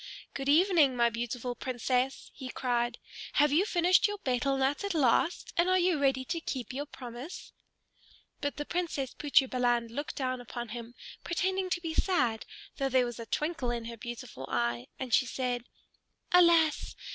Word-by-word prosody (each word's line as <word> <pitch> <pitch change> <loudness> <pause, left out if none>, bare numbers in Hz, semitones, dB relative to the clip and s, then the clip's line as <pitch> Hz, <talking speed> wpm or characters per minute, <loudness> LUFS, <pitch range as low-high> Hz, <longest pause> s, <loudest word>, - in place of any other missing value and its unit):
"Good 275 0 -3
evening, 315 -4 +5
my 235 -1 +3
beautiful 240 +1 -3
Princess!" 255 +1 -1
he 260 -2 -7
cried. 240 -2 -1 0.4
"Have 295 -1 +4
you 335 +7 +4
finished 355 +1 +4
your 415 0 -4
betel 270 - 0
nut 270 +6 +1
at 400 -3 -2
last, 300 +4 +2
and 345 +2 +3
are 370 - +4
you 355 -3 +2
ready 270 -2 +2
to 335 +5 -2
keep 255 -4 -4
your 285 +3 -4
promise?" 250 +4 -9 0.9
But 285 - -3
the 295 - -3
Princess 325 -7 -2
Putri 280 -2 +3
Balan 240 -2 +1
looked 285 +6 -5
down 255 -2 -2
at 245 - -13 0.2
him, 235 +1 -7 0.3
pretending 375 +2 -1
to 350 - -1
be 325 -2 -3
sad, 250 - +1 0.3
though 275 -2 0
there 255 -1 +3
was 240 -1 -6
a 230 - -7
twinkle 300 -1 -1
in 235 -1 -2
her 235 0 -6
beautiful 235 - -7
eye; 120 +1 -1
and 255 -3 -5
she 255 - +4
said, 250 -2 -2 0.7
"Alas! 335 -4 +4
265 Hz, 170 wpm, -30 LUFS, 240-325 Hz, 0.9 s, evening